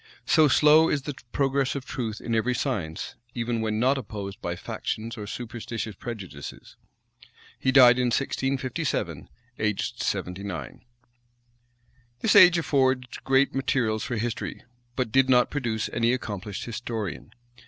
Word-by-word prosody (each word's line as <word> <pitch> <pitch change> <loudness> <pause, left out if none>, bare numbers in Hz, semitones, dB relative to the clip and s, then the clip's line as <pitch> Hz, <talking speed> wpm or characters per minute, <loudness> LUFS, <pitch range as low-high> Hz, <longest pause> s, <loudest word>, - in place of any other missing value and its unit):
So 155 -1 +5
slow 155 +3 +6
is 140 -3 0
the 145 - -4 0.2
progress 135 -1 +1
of 135 -2 -5
truth 110 -4 -4
in 115 - -3
every 120 +3 +1
science, 100 - -3 0.2
even 115 -1 -1
when 110 -1 -1
not 135 +3 +3
opposed 100 -4 -7
by 85 0 -3
factious 115 +6 -4
or 105 -3 -7
superstitious 115 -1 -5
prejudices. 95 -12 -8 0.8
He 130 - +2
died 125 -2 +7
in 125 - +2
1657, 130 +1 -2 0.3
aged 105 -2 -1
seventy 90 +2 -2
nine. 100 -4 -6 1.4
This 225 - +3
age 180 -3 +9
affords 130 -5 +1
great 135 +1 +2
materials 120 -5 0
for 120 - -3
history; 115 +1 -4 0.3
but 125 -4 -1
did 135 +1 +4
not 125 -1 +4
produce 115 -7 -1
any 115 +1 +2
accomplished 105 -5 -4
historian. 110 - -5
120 Hz, 135 wpm, -26 LUFS, 110-135 Hz, 1.4 s, age